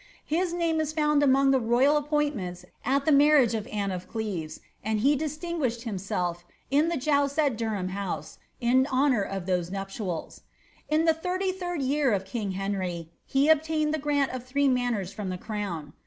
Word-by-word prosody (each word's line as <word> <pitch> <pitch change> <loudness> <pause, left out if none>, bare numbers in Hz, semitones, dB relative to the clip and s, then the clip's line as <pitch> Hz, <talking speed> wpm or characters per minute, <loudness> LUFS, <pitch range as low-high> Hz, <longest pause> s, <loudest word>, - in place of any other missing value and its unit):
His 345 +3 0
name 335 -2 +1
is 310 0 -2
found 300 -2 +2
among 275 -1 +4
the 265 - +4
royal 255 +6 +3
lents 215 - -1 0.2
at 275 +3 +1
the 315 - +4
marriage 285 -4 +5
of 220 0 -3
Anne 205 -4 -2
of 180 -1 -5
Cleves, 185 -9 -4 0.2
and 215 0 0
he 280 +5 +4
distinguished 300 -5 -2
in 190 - -2
the 340 - -1
jousts 280 +1 +1
at 290 -6 +2
Durham 215 -5 -2
House 180 -6 -5 0.2
in 255 +3 +3
honour 260 -4 +2
of 195 -2 -4
those 180 -2 0
nuptials, 195 -3 -5 0.5
lirty 330 +5 +1
third 355 -5 -3
year 275 -2 +2
of 190 -1 -1
king 200 -1 -3
Henry, 185 -4 -3 0.2
he 275 +2 +2
obtained 315 0 +2
the 310 - 0
grant 285 -2 +1
of 255 -1 -5
three 280 +3 +1 0.4
from 195 +1 -6
the 185 - -3
crown. 185 -8 -5
255 Hz, 165 wpm, -27 LUFS, 195-300 Hz, 0.5 s, marriage